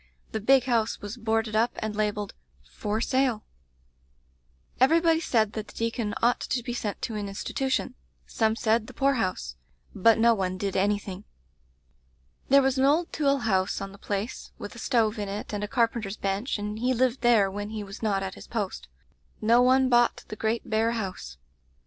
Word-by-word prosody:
The 220 - -2
big 265 +4 +5
house 230 -3 0
was 205 +2 -6
boarded 225 -2 -1
up 230 +2 +2
and 215 -1 -4
labelled 210 -1 -1 0.3
'For 210 - -3
Sale/ 255 -4 +1 1.4
"Everybody 325 +5 +4
said 220 -9 +1
that 215 -1 -5
the - - -15
deacon 230 -2 -2
ought 240 +1 +3
to 245 - -2
be 240 - -4
sent 210 -4 -4
to 230 - -2
an 205 -2 -3
institution; 260 +6 -2 0.3
some 220 -1 +1
said 225 -1 +1
the - - -12
poor 275 0 +3
house; 185 - -2 0.4
but 220 +3 +4
no 230 +1 +5
one 185 -3 -2
did 195 0 -3
anything. 200 0 -1 1.3
"There 275 +1 +6
was 265 0 +1
an 265 - +4
old 315 +5 +2
tool 280 -3 +1
house 190 -4 +1
on 195 0 -6
the 200 - -14
place, 205 +4 -4
with 205 - -8
a 235 - -10
stove 225 -3 +1
in 205 -1 -3
it 205 +2 -5
and 205 0 -2
a - - -2
carpenter's 230 -3 0
bench, 200 +6 -1
and 210 +1 -4
he 255 +2 +1
lived 255 +1 +1
there 225 -5 +4
when 205 +1 -5
he 215 -1 -5
was 195 +1 -10
not 200 -3 0
at 190 0 -4
his - - -12
post. 210 -5 -4 0.5
No 230 +3 +4
one 260 +1 +4
bought 240 -1 +3
the - - -5
great 220 +2 -2
bare 225 +1 +1
house. 185 - -5
220 Hz, 185 wpm, -27 LUFS, 205-245 Hz, 1.4 s, There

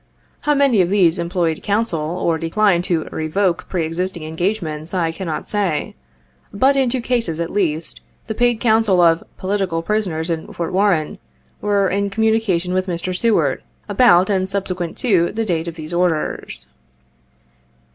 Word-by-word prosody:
How 295 0 +1
many 275 -7 +4
of 175 - +1
these 185 -3 +3
employed 170 -2 -1
counsel, 205 -4 0
or 165 +1 -1
declined 175 +2 +2
to 170 -5 0
"revoke" 170 +3 -1
pre 175 -4 -1
existing 170 +1 -3
engagements, 160 -1 -3
I 165 -3 +1
cannot 165 -2 -5
say. 195 -7 -1 0.6
But, 265 +7 +3
in 265 -2 +2
two 250 +1 -1
cases, 230 -10 -1
at 170 0 -2
least, 165 -5 -1 0.2
the 220 - -3
paid 240 0 +1
counsel 220 -5 +3
of 165 -1 +4
"poli 200 +2 -1
tical 165 -4 -2
prisoners" 180 -6 -1
in 160 -1 -4
Fort 170 0 -4
Warren, 190 -5 +1 0.4
were 200 -1 +2
in 200 +2 0
communication 210 -4 +1
with 185 +1 0
Mr. 180 +1 -3
Seward, 180 - +2 0.3
about 200 -4 +5
and 190 -1 0
subsequent 185 -3 -3
to 185 -9 +2
the 225 +1 -1
date 170 -4 -1
of 170 - -5
these 160 0 -7
orders. 170 - -1
185 Hz, 155 wpm, -19 LUFS, 165-205 Hz, 0.6 s, about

